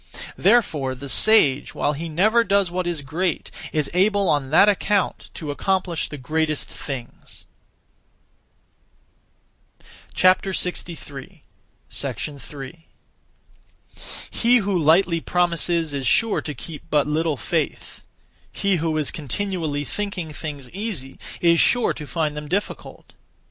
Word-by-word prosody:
Therefore 150 - +2
the 140 +2 -8
sage, 145 -4 +4
while 150 - +1
he 165 +3 -5
never 215 +9 +3
does 200 -3 +2
what 180 0 -2
is 165 -4 -2
great, 165 +5 -2 0.2
is 150 -2 0
able 200 +2 +3
on 145 -3 +1
that 165 +7 +6
account 205 -1 +1
to 150 -3 -4
accomplish 180 +1 -1
the 145 - -7
greatest 155 +3 -1
things. 130 -4 -8 2.7
3. 180 -4 -1 2.9
He 240 +2 +4
who 200 -3 0
lightly 165 +2 +4
promises 170 -2 +1
is 135 -3 -2
sure 225 - +3
to 150 - -5
keep 150 +5 -8
but 145 -2 +3
little 155 0 0
faith; - - -3 0.5
he 200 -2 +1
who 160 -1 -1
is 150 -3 0
continually 160 -1 -3
thinking 185 -3 -4
things 145 -3 -6
easy 185 - -5 0.2
is 170 -1 +4
sure 245 -1 +3
to 150 - -8
find 155 -2 -1
them 150 0 -6
difficult. 195 +6 -4
165 Hz, 115 wpm, -23 LUFS, 150-190 Hz, 2.9 s, that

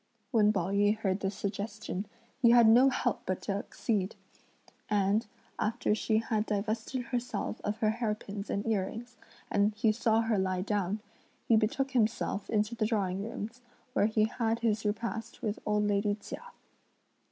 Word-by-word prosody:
When 215 -4 +5
Pao 185 -3 -1
yü 205 +2 +3
heard 195 -2 0
this 195 0 -2
suggestion, 205 -1 -4 0.3
he 235 - +7
had 235 -1 +7
no 245 +4 +7
help 245 -3 0
but 185 - 0
to - - -2
accede, 205 -2 -2 0.7
and, 205 +1 +2 0.3
after 225 0 +1
she 220 0 +1
had 220 -1 0
divested 220 +5 -2
herself 240 -2 -3
of 210 +1 -1
her 215 -1 +4
hair 220 -2 -1
pins 205 -1 -7
and 200 - -1
earrings, 225 +3 -2 0.3
and 205 +1 +2
he 215 +1 +3
saw 225 0 +2
her 225 -3 +1
lie 185 -1 0
down, 205 0 -1 0.5
he 230 - +5
betook 235 +5 +1
himself 220 -4 0
into 215 +1 +1
the 225 -2 0
drawing 195 -4 0
rooms, 225 +3 -6 0.3
where 210 - +3
he 215 -1 +2
had 230 0 -1
his 220 -2 +1
repast 225 +3 -3
with 215 -1 -1
old 210 0 +2
lady 205 0 +1
Chia. 210 - -8
215 Hz, 165 wpm, -31 LUFS, 205-230 Hz, 0.7 s, he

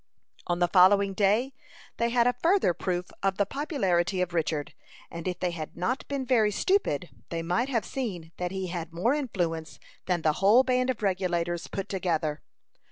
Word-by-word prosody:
On 175 - 0
the 175 0 +2
following 195 +2 +5
day 215 +7 +2 0.4
they 235 - +1
had 235 0 +3
a 245 - +3
further 350 - +3
proof 180 +1 -3
of 195 -1 0
the 200 - +2
popularity 195 - 0
of 180 -1 -1
Richard, 155 -3 -1 0.4
and 170 +1 -6
if 180 - -3
they 180 -1 0
had 160 -2 -7
not 235 +10 -2
been 280 -2 -3
very 230 -4 +3
stupid, 210 - 0 0.2
they 165 -1 -3
might 205 +10 0
have 230 -6 0
seen 185 -11 -4
that 180 0 -2
he 190 0 -4
had 170 -2 -5
more 185 +10 +1
influence 175 - -2 0.3
than 175 -3 0
the 155 - +3
whole 215 +6 +6
band 255 0 +1
of 235 -4 -2
Regulators 175 -3 -1
put 195 - -4
together. 165 -5 -1
190 Hz, 180 wpm, -28 LUFS, 175-235 Hz, 0.4 s, whole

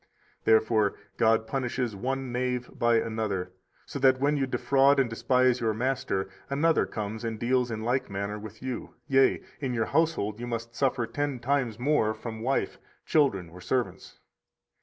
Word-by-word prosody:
Therefore 110 -2 +3 0.2
God 110 0 +3
punishes 125 -2 -2
one 130 +4 -3
knave 125 0 -2
by 120 0 +2
another, 110 -5 -1 0.3
so 140 - -6
that, 130 -1 +4
when 145 +2 +2
you 135 -2 0
defraud 140 +2 +3
and 135 - +3
despise 125 +2 +2
your 110 -2 0
master, 120 -6 -1 0.2
another 155 +4 +2
comes 110 +1 -5
and 115 -2 -3
deals 125 +1 +1
in 110 -1 -4
like 125 +3 0
manner 100 +2 -3
with 110 +2 -10
you, 130 -2 -5
yea, 135 -2 +3 0.2
in 130 -4 -2
your 115 -1 +1
household 140 -9 0
you 120 - -5
must 115 0 -4
suffer 125 -1 +1
ten 145 +3 -2
times 125 -2 0
more 125 -4 +2
from 110 0 -7
wife, 135 +4 -1 0.3
children, 120 - +2
or 90 +2 -12
servants. 125 +6 -2
120 Hz, 160 wpm, -28 LUFS, 110-135 Hz, 0.3 s, that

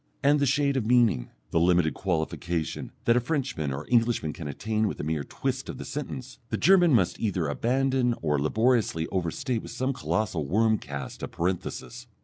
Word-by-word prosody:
And 145 +1 +4
the 140 - +2
shade 140 +1 +2
of 120 - 0
meaning, 115 - +3 0.2
the 80 - +3
limited 85 -2 +3
qualification, 85 -2 -2
that 115 - +5
a - - +5
Frenchman 130 - -2
or 70 +3 -4
Englishman 115 -10 +2
can 80 - -7
attain 110 +9 -1
with - - -4
a - - -3
mere 75 -1 -1
twist 135 - -3
of - - -5
the - - -7
sentence, 135 -3 -6
the - - -1
German 180 -3 +5
must 95 -6 +1
either 95 -8 0
abandon 125 - +1
or 75 -3 0
laboriously 110 - +2
overstate 110 - -1
with - - -9
some 130 +1 -1
colossal 110 - -1
wormcast 105 -7 0
of - - -5
parenthesis.... 95 +8 -3
110 Hz, 175 wpm, -27 LUFS, 80-130 Hz, 0.2 s, that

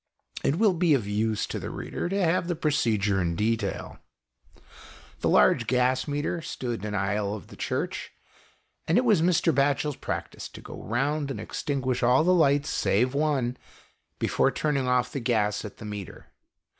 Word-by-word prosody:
It 140 - +2
will 210 -1 +4
be 170 -3 +3
of 120 -7 -1
use 105 +1 0
to - - -4
the - - -5
reader - - -4
to 195 +2 0
have 175 -1 +2
the 175 - -1
procedure 110 - +1
in 85 -1 -1
detail. 110 0 -2 1.2
The - - +1
large 65 - +4
gas 125 +2 +2
meter 145 +4 -2
stood 125 -7 -4
in - - -2
an 105 - -3
aisle 100 +1 -1
of 100 - -10
the - - -11
Church, - - -3 0.8
and 165 - +3
it 250 - +3
was 215 -8 +4
Mr. 170 -1 +3
Batchel's 140 +1 +1
practice - - -5
to - - -11
go - - -9
round 140 +5 -1
and 135 - -4
extinguish 130 -3 -2
all 125 +4 +4
the 180 +2 +4
lights 145 -4 +3
save 125 +6 +1
one, 140 -4 0 0.6
before - - +2
turning 140 -4 -1
off 125 -1 +1
the 140 - -3
gas 110 -4 0
at 105 - -8
the 110 - -9
meter. 105 -3 -8
130 Hz, 175 wpm, -27 LUFS, 110-155 Hz, 1.2 s, will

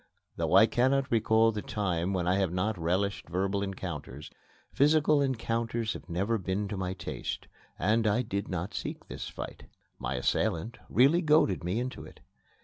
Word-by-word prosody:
Though - - +1
I - - +9
cannot 130 +2 +1
recall 115 0 +4
the 105 -1 -4
time 95 -4 -1
when 90 -2 -1
I 90 - +3
have 95 -4 +1
not 95 +4 0
relished 90 +3 -1
verbal 95 +3 0
encounters, 90 -7 -6 0.4
physical 150 0 +4
encounters 115 -3 -1
had - - -10
never 100 +7 0
been 95 +2 -2
to 105 - -3
my 95 -1 -2
taste, 85 -3 -5 0.3
and 110 +3 +2
I 105 +4 +2
did 100 -3 -3
not 90 +2 -3
seek - - -5
this - - -6
fight. - - -8 0.3
My 65 +2 -2
assailant 85 - -1
really 140 +8 +5
goaded 150 - +3
me 90 +6 -1
into 125 +1 -4
it. - - -13
100 Hz, 165 wpm, -29 LUFS, 90-115 Hz, 0.4 s, I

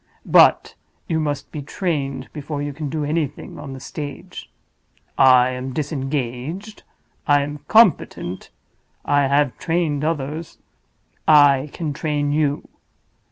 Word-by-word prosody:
But - - +5 0.3
you 160 -3 0
must 145 -3 -3
be 150 - -5
trained 140 -4 -3
before 150 -1 -5
you 145 0 -3
can 150 0 -5
do 150 +1 -2
anything 150 -2 -3
on 140 -2 -7
the 135 - -8
stage. 145 0 -8 0.6
I 130 -1 +6
am 130 +1 -5
disengaged—I 145 - -3
am 145 +1 -6
competent—I 145 - 0
have 140 -1 +2
trained 160 -4 -1
others—I 150 - 0
can 155 -4 -4
train 145 -1 -1
you. 145 -1 0
145 Hz, 110 wpm, -21 LUFS, 135-155 Hz, 0.6 s, I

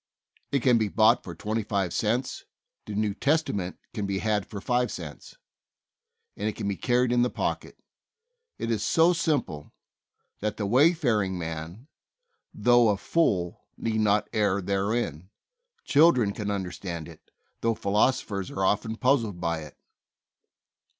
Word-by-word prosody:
It 140 -4 +1
can 125 -3 +5
be 110 - +1
bought 110 +2 +4
for 85 - -8
twenty 110 +6 -2
five 100 -4 -1
cents; 120 +4 -1 0.4
the 105 - -5
New 105 -1 0
Testament 105 - 0 0.2
can 105 -4 -3
be 100 -1 -1
had 105 -1 0
for 100 - -7
five 125 +4 0
cents, - - -8 1.0
and 110 - -2
it 105 - -6
can - - -4
be 100 - -1
carried 125 +1 +1
in 120 0 +3
the 125 - +2
pocket. - - -3 0.8
It 115 - -3
is 110 -2 0
so 160 +11 +4
simple 145 - -1 0.7
that 105 0 -2
"the 105 - -2
wayfaring 120 - +3
man, 80 +6 -6 0.7
though 120 +1 +4
a 100 - +2
fool," 95 - 0
need 110 -1 -1
"not 105 -1 +2
err 100 -2 +2
therein." 100 -3 -2 0.5
Children 140 -9 +4
can 105 0 -4
understand 90 -4 -4
it, - - -15 0.3
though 115 0 +1
philosophers 100 -2 0
are 95 - -1
often 110 +3 0
puzzled 115 -7 +1
by 85 -1 -1
it. 75 -1 -11
105 Hz, 145 wpm, -27 LUFS, 95-120 Hz, 1.0 s, can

